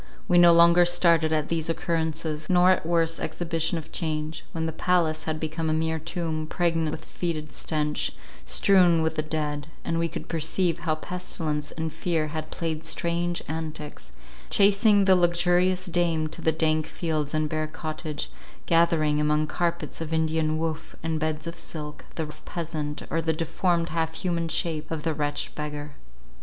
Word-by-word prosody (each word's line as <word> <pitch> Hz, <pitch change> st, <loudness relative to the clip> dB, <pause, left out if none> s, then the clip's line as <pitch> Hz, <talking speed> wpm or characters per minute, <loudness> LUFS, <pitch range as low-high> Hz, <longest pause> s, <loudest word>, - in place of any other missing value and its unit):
We 175 Hz, -1 st, +5 dB
no 175 Hz, -1 st, +8 dB
longer 170 Hz, +1 st, +7 dB
started 170 Hz, -2 st, +4 dB
at 155 Hz, -1 st, 0 dB
these 165 Hz, -1 st, -1 dB
occurrences, 160 Hz, -2 st, -1 dB
nor 180 Hz, 0 st, +6 dB
at 180 Hz, -3 st, +1 dB
worse 165 Hz, -1 st, +2 dB
exhibition 165 Hz, -1 st, -1 dB
of 160 Hz, -, -8 dB
change—when 160 Hz, 0 st, -3 dB
the 160 Hz, -, -1 dB
palace 160 Hz, -1 st, +1 dB
had 155 Hz, -1 st, -2 dB
become 160 Hz, +1 st, -2 dB
a -, -, +2 dB
mere 160 Hz, 0 st, 0 dB
tomb, 160 Hz, -1 st, -3 dB
pregnant 165 Hz, -2 st, +1 dB
with 160 Hz, +1 st, -6 dB
fetid 155 Hz, -4 st, -4 dB
stench, 150 Hz, -1 st, -1 dB, 0.3 s
strewn 175 Hz, -, +4 dB
with 160 Hz, -, 0 dB
the 155 Hz, -, 0 dB
dead; 150 Hz, -1 st, -3 dB, 0.2 s
and 165 Hz, -, 0 dB
we 165 Hz, -, +1 dB
could -, -, -7 dB
perceive 165 Hz, +2 st, 0 dB
how 155 Hz, -2 st, 0 dB
pestilence 155 Hz, -3 st, -3 dB
and 160 Hz, -1 st, -4 dB
fear 160 Hz, -3 st, -1 dB
had 155 Hz, 0 st, -5 dB
played 160 Hz, -2 st, -3 dB
strange 170 Hz, +1 st, -1 dB
antics, 155 Hz, -, -6 dB, 0.4 s
chasing 200 Hz, 0 st, +5 dB
the 190 Hz, -1 st, +6 dB
luxurious 180 Hz, +1 st, +2 dB
dame 170 Hz, -3 st, +1 dB
to -, -, -5 dB
the 160 Hz, -, +3 dB
dank 155 Hz, 0 st, +1 dB
fields 155 Hz, -3 st, -2 dB
and 155 Hz, 0 st, +1 dB
bare 155 Hz, 0 st, -2 dB
cottage; 155 Hz, -1 st, -5 dB, 0.3 s
gathering, 160 Hz, -3 st, +3 dB
among 150 Hz, 0 st, +2 dB
carpets 170 Hz, +1 st, -2 dB
of 160 Hz, -1 st, -4 dB
Indian 160 Hz, -1 st, +1 dB
woof, 160 Hz, -1 st, -3 dB
and 160 Hz, -1 st, -1 dB
beds 155 Hz, 0 st, -2 dB
of 170 Hz, 0 st, -6 dB
silk, 150 Hz, -2 st, -6 dB
the 160 Hz, -, -2 dB
rough 150 Hz, 0 st, -11 dB
peasant, 155 Hz, -3 st, -4 dB
or 165 Hz, -, +1 dB
the 160 Hz, 0 st, +1 dB
deformed 170 Hz, +1 st, 0 dB
half 160 Hz, 0 st, -1 dB
human 170 Hz, -2 st, -1 dB
shape 160 Hz, -1 st, -1 dB
of 160 Hz, -2 st, -4 dB
the 160 Hz, -, 0 dB
wretched 145 Hz, -1 st, -2 dB
beggar. 150 Hz, -1 st, -5 dB
160 Hz, 170 wpm, -26 LUFS, 155-170 Hz, 0.4 s, no